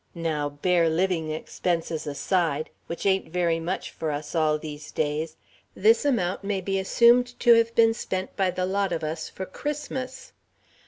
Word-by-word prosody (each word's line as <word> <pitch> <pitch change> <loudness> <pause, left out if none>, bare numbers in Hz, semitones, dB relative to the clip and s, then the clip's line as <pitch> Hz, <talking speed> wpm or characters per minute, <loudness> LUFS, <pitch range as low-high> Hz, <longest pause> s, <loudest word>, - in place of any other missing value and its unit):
Now, 155 -3 -1
bare 165 +3 +2
living 165 -1 0
expenses 160 0 -2
aside, 155 0 0 0.2
which 170 - -5
ain't 190 -1 +2
very 170 -2 +1
much 175 +3 -3
for 160 - -4
us 145 0 -4
all, 155 -2 +2
these 150 -1 -8
days, 155 +1 -2 0.4
this 225 +7 +4
amount 200 -10 0
may 200 -1 -1
be 195 +1 -1
assumed 245 +5 +4
to 240 -1 +7
have 230 0 +3
been 225 -1 +5
spent 190 -4 -4
by 190 -2 +2
the 180 0 -1
lot 195 +1 0
of 165 -2 -2
us 155 +1 -3
for 190 - -6
Christmas. 265 +2 -5
180 Hz, 165 wpm, -26 LUFS, 160-200 Hz, 0.4 s, to